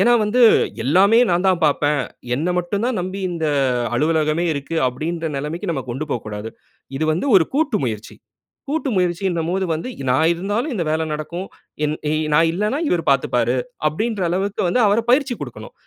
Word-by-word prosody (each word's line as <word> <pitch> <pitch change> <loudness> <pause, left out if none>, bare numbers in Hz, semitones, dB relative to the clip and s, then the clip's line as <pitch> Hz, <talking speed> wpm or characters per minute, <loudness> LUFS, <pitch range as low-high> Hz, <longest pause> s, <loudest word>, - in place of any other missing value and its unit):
ஏன்னா 240 - +5
வந்து, 225 +4 +1 0.4
எல்லாமே 195 - +5
நான் 175 +2 +1
தான் 180 -2 +2
பார்ப்பேன். 145 0 +1 0.3
என்ன 155 +7 -1
மட்டும் 190 +5 -2
தான் 250 -6 -1
நம்பி, 185 +2 -4
இந்த 165 -2 -2 0.5
அலுவலகமே 155 +4 +1
இருக்கு, 140 +3 -5
அப்படின்ற 160 +6 -3
நிலமைக்கு 165 +7 -3
நம்ம 140 -5 -2
கொண்டு 135 +6 -3
போகக்கூடாது. 110 -1 -4 0.5
இது 155 - 0
வந்து 175 - -2
ஒரு 160 - +4
கூட்டு 295 -6 +1
முயற்சி. 110 -2 -5 0.5
கூட்டு 305 -1 -1
முயற்சின்னும்போது 180 0 0
வந்து 165 +10 -5 0.2
நான் 160 +6 +3
இருந்தாலும் 205 - -2
இந்த 185 - -1
வேலை 160 +1 0
நடக்கும். 170 +5 -5 0.4
என் 150 0 0 0.2
எ - - +1 0.2
நான் 165 +2 +5
இல்லனா 210 - -1
இவரு 175 -2 +1
பார்த்துப்பாரு. 125 -2 +1 0.3
அப்படின்ற 215 +7 -1
அளவுக்கு 195 +3 -1
வந்து 245 +8 +2
அவர 205 +2 +3
பயிற்சி 265 -1 +3
குடுக்கணும். - - -8
170 Hz, 165 wpm, -20 LUFS, 150-200 Hz, 0.5 s, ஏன்னா